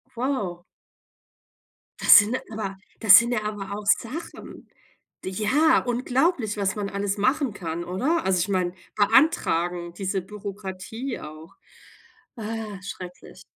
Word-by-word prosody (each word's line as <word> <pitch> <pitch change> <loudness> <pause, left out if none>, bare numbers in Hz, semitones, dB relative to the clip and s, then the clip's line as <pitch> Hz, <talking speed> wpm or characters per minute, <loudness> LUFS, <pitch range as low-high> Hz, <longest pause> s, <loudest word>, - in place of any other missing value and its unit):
Wow. 210 -9 -2 1.4
Das - - +9
sind 210 +4 +4 0.2
aber 195 -3 -5 0.2
das 210 -5 +9
sind 235 +1 +3
ja 215 -2 -1
aber 205 -1 -5
auch 210 - -8
Sachen. 255 +9 -3 0.5
D - - -3
ja, 260 +11 +3
unglaublich, 250 - 0
was 200 0 0
man 205 -1 -3
alles 200 +1 -2
machen 260 +2 +1
kann, 170 -2 -5
oder? 260 - -1
Also, 190 -1 +2
ich 185 +4 -1
meine, 180 -2 0 0.2
beantragen. 180 - +2
Diese 190 +1 -2
Bürokratie 205 +4 -7
auch. 155 +2 -11 0.8
Ah, 215 -2 -5
schrecklich. 180 -2 -9
205 Hz, 125 wpm, -25 LUFS, 185-235 Hz, 1.4 s, Das